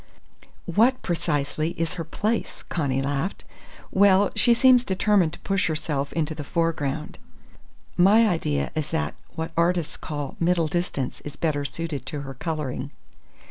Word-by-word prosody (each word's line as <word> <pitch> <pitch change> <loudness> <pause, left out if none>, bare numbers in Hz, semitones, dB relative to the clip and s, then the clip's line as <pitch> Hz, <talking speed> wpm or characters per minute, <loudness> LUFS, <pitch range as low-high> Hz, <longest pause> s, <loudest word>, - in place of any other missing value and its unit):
"What, 230 +9 +3
precisely, 160 -1 -1
is 165 -1 -1
her 170 - -4
place?" 215 +7 -2
Connie 135 -5 0
laughed. 145 +7 -2 0.5
"Well, 200 0 +5
she 240 -1 +4
seems 250 0 +6
determined 190 -5 +2
to - - -10
push 195 -1 0
herself 150 -3 -2
into 160 -1 -1
the 150 -1 -6
foreground. 155 -2 -2 0.8
My 210 +5 +6
idea 75 - 0
is 155 -2 -2
that 75 -1 -1 0.2
what 160 +1 -3
artists 170 -1 +1
call 145 -3 -5
middle 170 -1 +2
distance 155 -6 -2
is 145 - -8
better 145 -3 -1
suited 145 -3 -4
to 145 +1 -3
her 135 -1 -7
colouring. 150 -1 -3
165 Hz, 140 wpm, -25 LUFS, 145-180 Hz, 0.8 s, seems